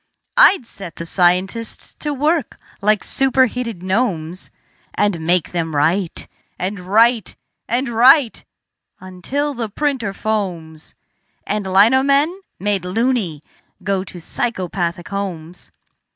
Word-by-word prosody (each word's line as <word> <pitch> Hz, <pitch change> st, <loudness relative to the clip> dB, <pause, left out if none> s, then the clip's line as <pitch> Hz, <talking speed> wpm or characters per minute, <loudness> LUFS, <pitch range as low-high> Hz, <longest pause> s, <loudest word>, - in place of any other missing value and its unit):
I'd 395 Hz, -, +6 dB
set 185 Hz, -7 st, -9 dB
the 170 Hz, -, -6 dB
scientists 185 Hz, +6 st, 0 dB
to 300 Hz, -, -2 dB
work 295 Hz, +1 st, 0 dB, 0.2 s
like 210 Hz, +1 st, +2 dB
superheated 250 Hz, -6 st, +1 dB
gnomes, 185 Hz, -4 st, -1 dB, 0.5 s
And 170 Hz, -6 st, +1 dB
make 175 Hz, -2 st, +2 dB
them 165 Hz, -3 st, -2 dB
write 165 Hz, +5 st, 0 dB, 0.3 s
and 195 Hz, +2 st, -3 dB
write 220 Hz, +4 st, +2 dB, 0.3 s
and 245 Hz, +3 st, 0 dB
write 240 Hz, +2 st, +4 dB, 0.6 s
until 220 Hz, +11 st, -3 dB
the 235 Hz, -4 st, -4 dB
printer 265 Hz, -3 st, -1 dB
foams 180 Hz, -7 st, -4 dB, 0.5 s
And 205 Hz, -3 st, -2 dB
lino 220 Hz, +8 st, +5 dB
men, 285 Hz, +7 st, +2 dB, 0.2 s
made 200 Hz, -1 st, -1 dB
"loony", 190 Hz, -, -1 dB, 0.4 s
go 195 Hz, -2 st, 0 dB
to 180 Hz, -, -10 dB
psychopathic 175 Hz, -3 st, -3 dB
homes. 180 Hz, -4 st, -5 dB
200 Hz, 110 wpm, -19 LUFS, 180-245 Hz, 0.6 s, I'd